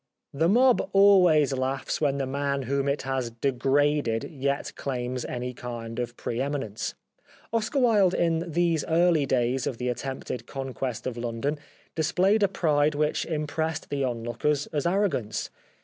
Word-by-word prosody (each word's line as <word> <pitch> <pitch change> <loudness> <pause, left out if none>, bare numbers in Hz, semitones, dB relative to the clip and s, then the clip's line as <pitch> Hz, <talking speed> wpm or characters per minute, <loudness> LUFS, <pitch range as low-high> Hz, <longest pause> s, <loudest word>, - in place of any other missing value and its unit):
The 160 +4 +2
mob 250 +4 +4
always 180 -8 +6
laughs 130 +2 -2
when 140 -2 +2
the 135 - -1
man 140 +1 -1
whom 140 +2 0
it 140 - -1
has 130 -2 -2
degraded 135 0 +1
yet 140 -1 -2
claims 125 -2 -3
any 125 0 -4
kind 120 -1 -6
of 120 -1 -4
pre 120 +2 -3
eminence. 135 -7 -3 0.6
Oscar 230 +5 0
Wilde 215 -8 +4
in 165 0 0
these 170 -1 +1
early 165 -3 +3
days 125 0 +1
of 120 - -3
the 125 +1 -2
attempted 125 -1 -5
Conquest 130 -3 -4
of 125 -2 -3
London 120 +5 -2 0.3
displayed 185 +6 +2
a 200 - +5
pride 150 -5 +1
which 150 +1 0
impressed 160 0 -2
the 140 -1 0
onlookers 125 +4 -1
as 150 +1 0
arrogance. 175 - -1
140 Hz, 150 wpm, -26 LUFS, 125-160 Hz, 0.6 s, always